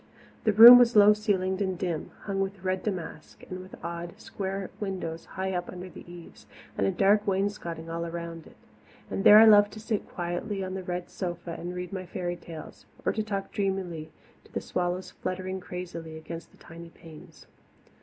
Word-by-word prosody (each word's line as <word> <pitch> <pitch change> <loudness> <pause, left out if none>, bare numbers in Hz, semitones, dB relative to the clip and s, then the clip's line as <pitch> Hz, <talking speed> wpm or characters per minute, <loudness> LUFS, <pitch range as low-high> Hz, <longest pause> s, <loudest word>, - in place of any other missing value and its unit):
The 215 - +3
room 235 +4 +12
was 240 -1 +4
low 210 0 +8
ceilinged 195 -3 -1
and 190 -2 -1
dim, 170 -4 -3
hung 195 -1 -3
with 195 -1 -4
red 185 0 -1
damask, 175 -6 -6
and 185 - -5
with 185 +1 -11
odd, 170 0 -6
square 195 -1 -5
windows 185 -5 -4
high 190 0 -1
up 175 -1 -3
under 180 0 -8
the 175 - -12
eaves 175 -1 -13 0.3
and 100 - +1
a - - +2
dark 205 +2 +3
wainscoting 190 -4 -2
all 170 +1 -4
around 170 -1 -7
it. - - -17 0.6
And 195 - -2
there 210 - +10
I 220 - +9
loved 205 -1 +7
to 215 - -9
sit 215 -1 -3
quietly 175 +3 -3
on 185 0 -5
the 190 - -4
red 180 -1 -5
sofa 175 -2 -5
and 175 +2 -6
read 180 +1 -6
my 185 -2 -5
fairy 175 -1 -3
tales, 165 -2 -11 0.2
or - - +2
talk 210 -3 -3
dreamily 185 -6 -3 0.3
to - - -22
the - - -2
swallows 180 +1 -3
fluttering 185 +1 -4
crazily 175 -3 -7
against 165 +1 -8
the - - -23
tiny 170 0 -12
panes. 160 -2 -15
185 Hz, 185 wpm, -28 LUFS, 170-195 Hz, 0.6 s, room